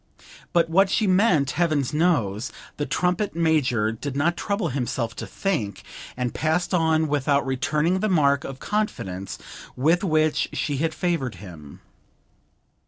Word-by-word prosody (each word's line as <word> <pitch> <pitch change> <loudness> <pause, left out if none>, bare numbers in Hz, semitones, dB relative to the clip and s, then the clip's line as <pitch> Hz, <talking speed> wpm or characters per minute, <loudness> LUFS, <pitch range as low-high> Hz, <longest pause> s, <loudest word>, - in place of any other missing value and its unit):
But 170 -2 +3
what 190 +4 +3
she 215 - +1
meant 185 - +3
heaven 155 -3 +1
knows: 125 - +1 0.3
the 145 - -2
trumpet 180 +3 0
major 140 -10 +2
did 135 +5 -5
not 165 +5 +1
trouble 200 +2 -1
himself 120 -3 -2
to - - -5
think, 135 - -2 0.3
and 125 -1 -2
passed 160 +4 0
on 160 -2 +2
without 145 -1 +1
returning 150 +7 0
the 215 - 0
mark 140 -6 +3
of 135 - -6
confidence 100 - -3 0.4
with 165 +8 +2
which 155 -4 +1
she 145 -3 -1
had 160 +2 -1
favoured 165 - -1
him. 85 -6 -12
155 Hz, 140 wpm, -24 LUFS, 130-175 Hz, 0.4 s, But